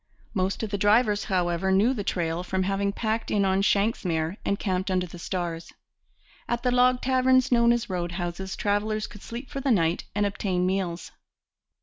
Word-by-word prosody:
Most 190 +1 -1
of 215 - -3
the 200 - -2
drivers, 210 +1 +3
however, 180 0 0
knew 205 +7 +4
the 210 -6 -3
trail 170 -3 -1
from 185 +1 -1
having 195 +1 0
packed 220 +2 -2
in 200 -2 +2
on 190 0 +2
shanks's 210 +2 +1
mare 165 -1 -1
and 200 - 0
camped 190 -2 -1
under 185 -1 +1
the 175 0 -11
stars. 170 -2 -4 0.8
At 240 0 -1
the 250 - +2
log 250 0 +4
taverns 260 0 +3
known 235 -1 +5
as 235 -1 0
road 175 -2 -3
houses 175 +1 -4
travellers 215 +1 0
could 205 - -12
sleep 240 +3 -7
for 275 - -4
the 275 - -1
night 170 -7 +2
and 205 0 +2
obtain 190 -3 -1
meals. 185 -2 -2
200 Hz, 190 wpm, -26 LUFS, 180-225 Hz, 0.8 s, known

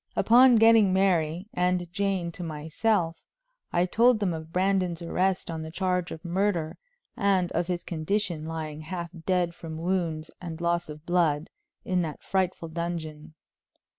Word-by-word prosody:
Upon 245 +2 +6
getting 225 -3 +6
Mary 180 -2 +1
and 180 0 +1
Jane 195 -3 -1
to 175 - -10
myself, 165 +3 -1 0.5
I 175 +1 +2
told 235 +6 +4
them 195 -4 0
of 160 0 -7
Brandon's 185 -2 0
arrest 185 +1 0
on 160 -1 -4
the 160 - -6
charge 180 0 -1
of 160 +2 -8
murder, 175 -3 -1 0.4
and 190 -3 +1
of 170 +1 -1
his 175 -1 -2
condition, 170 -1 -2
lying 155 -2 -5
half 170 +1 -5 0.2
dead 180 -2 +1
from 160 -2 -8
wounds 165 -2 -2
and 170 -2 -6
loss 170 -1 0
of 150 +1 -9
blood, 165 -4 +1 0.3
in 185 -1 +1
that 155 -3 -5
frightful 185 -3 -1
dungeon. 160 -2 -5
175 Hz, 150 wpm, -27 LUFS, 160-190 Hz, 0.5 s, Upon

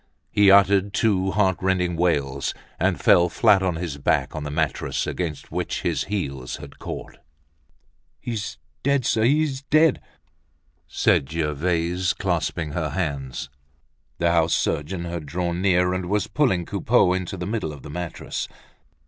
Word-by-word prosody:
He 105 -1 +5
uttered 100 0 +5
two 100 -3 +2
heart 95 -2 +2
rending 90 -2 +1
wails, 70 -5 0 0.2
and - - +1
fell 85 0 +5
flat 105 0 +4
on 90 -3 0
his 80 -4 -4
back 70 - +1
on 75 - -4
the 75 - -4
mattress, 75 0 -1
against 80 -5 -4
which - - -3
his - - 0
heels 70 -11 -3
had 70 -1 -11
caught. - - -7 1.0
"He's 105 -3 -4 0.2
dead, 140 -2 +1
sir, 110 - +2
he's 140 +1 +2
dead!" 155 +1 +3 0.9
said 65 - +2
Gervaise, 85 +3 0
clasping 80 -3 -2
her 80 0 -2
hands. 70 -6 -3 0.7
The 85 0 +2
house 85 -1 +3
surgeon 85 +4 -1
had 85 -3 -5
drawn 85 +3 -2
near, 90 -1 +3
and 90 -1 -3
was 105 +2 +1
pulling 105 - +1
Coupeau 90 - +2
into 95 +1 -3
the 90 - -4
middle 105 -5 -2
of 70 -3 -11
the 70 - -8
mattress. 90 +1 -4
90 Hz, 150 wpm, -24 LUFS, 80-100 Hz, 1.0 s, He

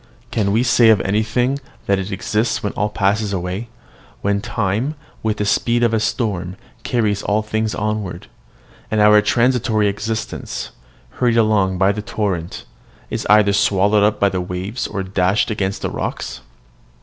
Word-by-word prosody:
Can 105 -3 +1
we 115 +4 +2
say 120 -2 +5
of 110 -3 +5
anything 110 +7 0 0.3
that 100 -1 +2
it 95 +2 -4
exists 105 +4 -1
when 105 - -2
all 105 - -1
passes 100 +1 0
away, 95 +5 -3 0.5
when 100 0 +1
time, 110 +8 -1 0.3
with 110 -1 -1
the 105 - -1
speed 120 +4 +1
of 115 -1 +2
a 110 - +2
storm, 100 -5 -2 0.3
carries 110 -5 0
all 105 +1 0
things 110 0 -2
onward, 105 -4 -3 0.6
and 110 - 0
our 105 0 +6
transitory 115 -1 +2
existence, 110 +2 -4 0.4
hurried 120 -2 +1
along 105 -4 +2
by 95 +2 +3
the 105 +1 -4
torrent, 95 -5 -3 0.5
is - - -3
either 105 -1 +5
swallowed 100 +1 +3
up 105 +1 +2
by 100 - +4
the 90 -1 -2
waves 90 +6 -4
or 95 - -4
dashed 95 +4 +1
against 100 -2 -2
the - - 0
rocks? - - -4
105 Hz, 160 wpm, -19 LUFS, 100-110 Hz, 0.6 s, our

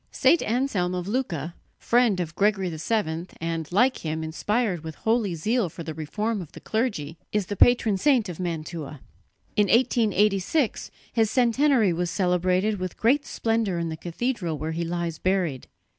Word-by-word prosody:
St. 340 - +3
Anselm 215 -7 0
of 180 0 -4
Lucca, 180 - -2 0.2
friend 235 -5 +2
of 165 -2 -3
Gregory 195 -3 +1
VII, 165 -1 -1
and, 165 -1 -3
like 245 +8 +3
him, 160 0 -3
inspired 185 +3 -1
with 160 -1 -7
holy 220 -5 0
zeal 215 +4 0
for 170 - -8
the 160 - -5
reform 210 +8 -2
of 165 - -11
the - - -9
clergy, 185 - -2
is 210 -2 0
the 205 - -4
patron 225 -3 +4
saint 260 -5 +3
of 175 -2 -7
Mantua. 160 -4 -5 0.6
In 210 -1 +3
1886 220 - +2 0.2
his 225 -2 +2
centenary 245 -3 +3
was 175 +1 -1
celebrated 185 +3 +1
with 185 -1 -4
great 280 +7 +2
splendour 225 - 0
in 170 -1 -2
the 160 - -4
cathedral 175 0 -3
where 155 +3 -3
he 165 +1 -2
lies 170 -1 -3
buried. 180 -8 0
185 Hz, 160 wpm, -25 LUFS, 165-225 Hz, 0.6 s, patron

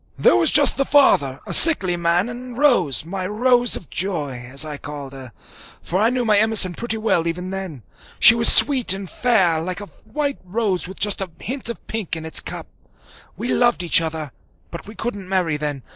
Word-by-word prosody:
There - - +3
was - - +2
just - - +5
the 275 - +1
father, 145 - +2
a - - -5
sickly 195 - +6
man, 170 +3 0
and 245 0 -10
Rose, 210 - +1
my 185 +1 -5
"Rose 245 +3 +1
of 175 - -10
joy," 150 -10 -4
as 140 +3 -2
I 150 -2 -6
called 145 -2 -9
her, 130 -2 -10 0.5
for 180 - -3
I 225 - +2
knew 250 -1 -3
my 210 -2 +2
Emerson 215 -4 +3
pretty 225 +3 -5
well 200 -7 -1
even 180 +2 -5
then. 185 - -7 0.4
She - - +7
was 230 0 +5
sweet 260 -9 +5
and 195 0 -7
fair, 190 -8 +1
like 180 +3 -5
a 205 - -8 0.3
white 290 -2 -3
rose 185 -3 -3
with 190 - -11
just 205 -1 +2
a 190 - -4
hint 255 +1 -4
of 235 - -8
pink 220 -7 -5
in 160 -1 -8
its 160 - +2
cup. - - -7 0.7
We 245 - -5
loved 240 -6 +1
each 170 0 +3
other, 160 -3 -5 0.4
but 170 - -10
we 215 - -12
couldn't 205 -5 -7
marry 180 -5 -1
then. 145 -3 -4
190 Hz, 205 wpm, -19 LUFS, 165-235 Hz, 0.7 s, She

